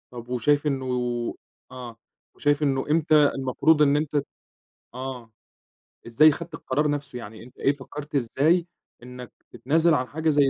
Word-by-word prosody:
طب 120 -1 -10
و 125 - -1
شايف 145 +4 +2
إنه 135 -2 -1 0.9
آه، 125 -3 -9 0.4
وشايف 145 0 +1
إنه 135 -2 0
إمتى 155 0 +3 0.2
المفروض 135 +4 +2
إن 145 -1 +4
أنت 150 0 -3
ت 140 - 0 0.7
آه. 125 -2 -7 0.8
إزاي 145 +7 +6
أخدت 165 +2 -5
القرار 150 -1 -1
نفسه، 145 -3 -4
يعني 110 0 -10
أنت 125 - -17
إيه 140 - +1
فكرّت 145 +2 -9
إزاي 150 +7 +2 0.4
إنك 125 0 -10 0.2
تتنازِل 160 +5 +2
عن 130 -4 0
حاجة 160 +3 -1
زي 145 -2 +4
140 Hz, 155 wpm, -25 LUFS, 125-150 Hz, 0.9 s, إزاي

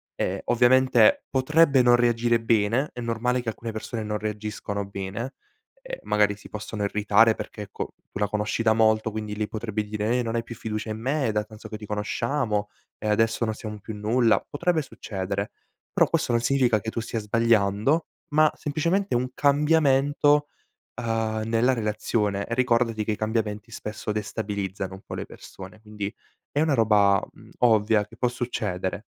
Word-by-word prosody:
Ehm, - - -1
ovviamente 130 - +4
potrebbe 140 +1 +4
non 120 0 +6
reagire 120 -1 +2
bene, 115 +4 +2
è 125 - -6
normale 120 +2 0
che 120 - -3
alcune 115 +1 -5
persone 110 +1 -5
non 105 0 -2
reagiscono 105 -1 -4
bene, 100 +6 -5 0.5
ehm, - - -7
magari 105 -1 +2
si 105 - -14
possono 105 0 -5
irritare, 105 +2 +4
perché 105 - -7
ecco, 100 - -6 0.2
tu - - -6
la 105 - +2
conosci 105 +2 -1
da 110 -1 +4
molto 110 0 +3
quindi 105 -1 -4
lei 105 0 -2
potrebbe 110 -1 -3
dire: 105 +3 -1
"Eh, - - 0
non 115 0 -3
hai 115 - 0
più 115 - -9
fiducia 110 0 -4
in 110 0 -4
me, 135 +4 0
è - - +1
da 105 0 0
tanto 105 0 -12
che 110 - -5
ci 105 - -9
conosciamo 105 +1 -1 0.3
e - - -5
adesso 115 +2 +2
non 110 - -1
siamo 105 -1 -7
più 110 +2 -7
nulla"; 115 +2 +2
potrebbe 170 +2 0
succedere. 100 -6 -4 0.4
Però - - +4
questo - - 0
non 120 0 +2
significa 120 -3 +3
che 110 - -4
tu - - -3
stia 115 0 -3
sbagliando 110 +5 +2 0.3
ma 155 0 +5
semplicemente 170 +7 -1
un 125 +1 +1
cambiamento, 145 0 +3 0.5
uhm, 110 -1 -1
nella 115 +3 +2
relazione 105 -2 -1
e 115 - -2
ricordati 115 -3 +2
che 110 - -1
i - - 0
cambiamenti 110 0 -2
spesso 105 0 -5
destabilizzano 100 -3 -3
un 95 - -13
po' - - -8
le - - -4
persone; 95 +3 -12
quindi 105 -1 -5 0.4
è 145 - -1
una 155 -2 +2
roba, 105 -4 +4
mhmm, - - -17
ovvia 110 -3 +4
che 110 +2 -16
può 125 - +1
succedere. 110 -7 -3
110 Hz, 175 wpm, -25 LUFS, 105-125 Hz, 0.5 s, non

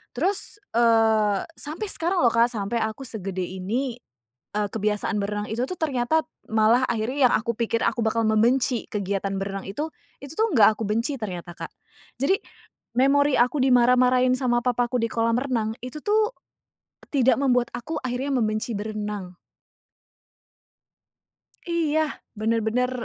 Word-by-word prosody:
terus, 390 - -1 0.2
eee, 220 -3 +4 0.2
sampai 320 +9 -5
sekarang 345 +1 0
loh - - +7
Kak 230 +1 +4
sampai 210 +1 -2
aku 220 +4 -6
segede 195 -4 -4
ini, 215 +8 -3 0.6
eee, 210 0 +1
kebiasaan 210 0 -1
berenang 210 +1 -3
itu 235 +3 -1
tuh 365 - -5
ternyata 300 0 +1 0.3
malah 225 +4 +4
akhirnya 245 +4 +2
yang - - +1
aku 225 +1 -2
pikir 230 -1 0
aku 235 - 0
bakal 225 +1 +1
membenci 235 +3 +2
kegiatan 195 -1 -2
berenang 195 0 -4
itu, 295 +11 -3 0.3
itu 280 +2 -8
tuh 445 - +3
nggak 215 -4 +6
aku 225 - -3
benci 230 +7 -1
ternyata 180 -6 -6
Kak. - - -7 0.5
Jadi 380 +8 +3 0.6
memori 280 +2 +4
aku 250 +4 +2
dimarah-marahin 250 0 +4
sama 245 -2 +1
papaku 245 0 0
di 230 - 0
kolam 230 0 +1
renang 235 -5 -1
itu 255 +4 -7
tuh 430 +1 +2 0.8
tidak 265 -3 +4
membuat 250 -3 +2
aku 295 +6 -4
akhirnya 255 +3 -2
membenci 220 -2 0
berenang. 205 -3 -5 2.3
Iya 315 -3 0 0.2
benar-benar, 225 +3 0
235 Hz, 140 wpm, -24 LUFS, 215-265 Hz, 2.3 s, loh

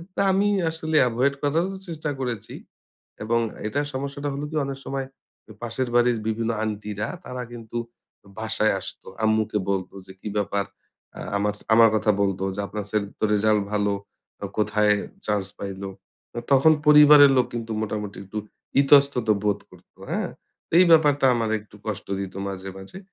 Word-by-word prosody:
তো - - -4
আমি 195 +2 +2 0.2
আসলে 160 -1 -3
এভয়েড 125 +4 +1
করারও 165 +7 0
চেষ্টা 155 -3 -4
করেছি 120 -6 -4 0.7
এবং 115 +2 +1 0.3
এটার 145 +5 -1
সমস্যাটা 140 +2 -4
হলো 140 +2 -4
কি - - -5
অনেক 135 0 -5
সময় 135 -1 -3 0.4
এ - - -10
পাশের 120 +2 -2
বাড়ির 120 -1 +4
বিভিন্ন 115 +1 -1
আন্টিরা 105 -1 -3 0.2
তারা 125 0 -5
কিন্তু 115 -1 -7 0.6
বাসায় 110 -1 +1
আসতো। - - -9 0.2
আম্মুকে 110 -1 +2
বলত 95 -2 -1 0.2
যে - - -10
কী - - -7
ব্যাপার 100 0 0 0.5
আ - - -8 0.2
আমাস 105 +1 -1 0.2
আমার 115 0 +7
কথা 105 0 +3
বলত 95 -1 0 0.2
যে, - - -6
"আপনার 105 +1 -5
ছেলের 105 -2 -1
তো - - -4
রেসাল্ট 105 0 +3
ভালো। 105 -1 +1 0.5
ও - - -1
কোথায় 105 0 +3 0.3
চান্স 105 -2 0
পাইল?" 100 -1 -6 0.5
তো - - -9
তখন 140 +4 +6 0.2
পরিবারের 150 -1 +9
লোক 125 - +4
কিন্তু 115 -1 -4
মোটামুটি 105 -2 -4
একটু 100 +3 -8 0.4
ইতস্তত 140 -4 +4 0.2
বোধ 105 -1 +1
করত। - - -19 0.2
হ্যাঁ? - - -1 0.5
এই 180 - +8
ব্যাপারটা 145 -4 +5
আমার 115 -2 -1
একটু 105 0 -18
কষ্ট 105 - -4
দিত 95 -1 -5
মাঝে, 95 0 -6
মাঝে। 95 - -10
115 Hz, 160 wpm, -24 LUFS, 105-140 Hz, 0.7 s, পরিবারের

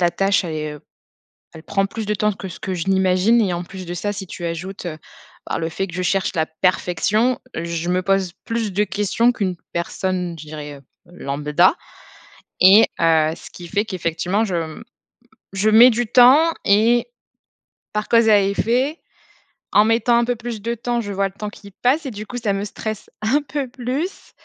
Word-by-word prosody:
la 175 -1 +3
tâche, 195 +2 +1
elle 160 -2 -4
est, 155 -1 -4
heu 150 - -12 0.7
elle 160 - -11
prend 195 +1 0
plus 220 +2 -6
de 210 - -1
temps 210 +1 +1
que 195 - -8
ce 170 - -10
que 190 - -3
je 175 +1 -3
n'imagine. 190 +4 +3
Et 185 -5 +1
en 175 0 -4
plus 185 0 -9
de 175 - -5
ça, 205 +4 -2
si 195 -1 -6
tu 175 - -8
ajoutes, 175 +3 -5
heu, 155 -2 -5 0.5
bah, - - -2
le 165 0 -2
fait 195 +4 -3
que 170 - -11
je 185 - -2
cherche 190 +2 0
la 160 - +1
perfection, 185 +8 +1 0.2
je 170 +1 -3
me 180 +1 +1
pose 195 -1 +1
plus 230 -2 -2
de 205 +3 +2
questions 210 +5 +1
qu'une 185 -6 -2 0.2
personne, 180 0 -2
je 155 - -9
dirais, 150 -1 -7
heu, 140 - -13 0.3
lambda. 150 - +1 0.9
Et 195 +4 +8 0.2
heu, 160 -1 +3
ce - - -12
qui 175 -1 -11
fait 205 +3 0
qu'effectivement, 180 +1 -1
je 190 -5 -3
m 165 +6 -5 0.7
je 200 +3 +1
mets 235 +4 +8
du 240 +1 -1
temps 260 +8 +6
et 225 - +3 0.8
par 210 0 -2
cause 230 -1 +4
à 205 -2 +6
effet, 245 - 0 0.7
en 210 - +6
mettant 235 +1 +3
un 235 - +3
peu 245 0 0
plus 225 -2 -6
de 235 +2 -2
temps, 240 0 -2
je 205 -2 -6
vois 195 0 0
le 190 - -13
temps 210 +1 -5
qui 200 -1 -14
passe 270 - 0
et 265 - -4
du 215 0 -7
coup, 245 - -6
ça 215 -4 -1
me 195 - -2
stresse 215 +1 -6
un 260 +8 +2
peu 285 -2 -4
plus 260 +9 -4
195 Hz, 205 wpm, -20 LUFS, 175-230 Hz, 0.9 s, Et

